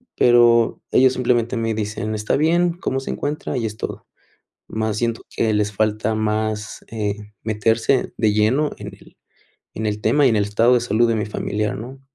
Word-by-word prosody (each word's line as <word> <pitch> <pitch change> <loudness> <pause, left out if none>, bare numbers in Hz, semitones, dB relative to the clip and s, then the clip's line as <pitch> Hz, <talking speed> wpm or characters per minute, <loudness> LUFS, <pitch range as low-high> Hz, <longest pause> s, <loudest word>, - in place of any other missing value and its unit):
Pero 120 -1 +4
ellos 130 0 +5
simplemente 120 -1 0
me 115 0 -1
dicen: 110 0 -3
"Está 105 +4 0
bien, 170 +3 +2
¿cómo 135 -6 -3
se - - -5
encuentra?, 145 -1 -3
y 115 - -1
es 110 -1 -5
todo". - - -6 0.6
Mas 110 -1 -2
siento 115 -1 -1
que 110 -1 +1
les 105 0 0
falta 110 +1 0
más, 110 0 -2
eh, 105 -3 -2 0.3
meterse 110 +4 +1
de 110 -2 +2
lleno 115 +9 +2
en - - -7
el - - -15 0.6
en 110 - -3
el 105 0 -2
tema 145 +6 +3
y - - +6
en 115 - +1
el 100 - +2
estado 115 +4 +3
de 120 - +3
salud 120 0 +2
de 115 - +1
mi 105 -2 -1
familiar, 105 0 -3
¿no? 130 +5 -9
110 Hz, 190 wpm, -21 LUFS, 105-125 Hz, 0.6 s, y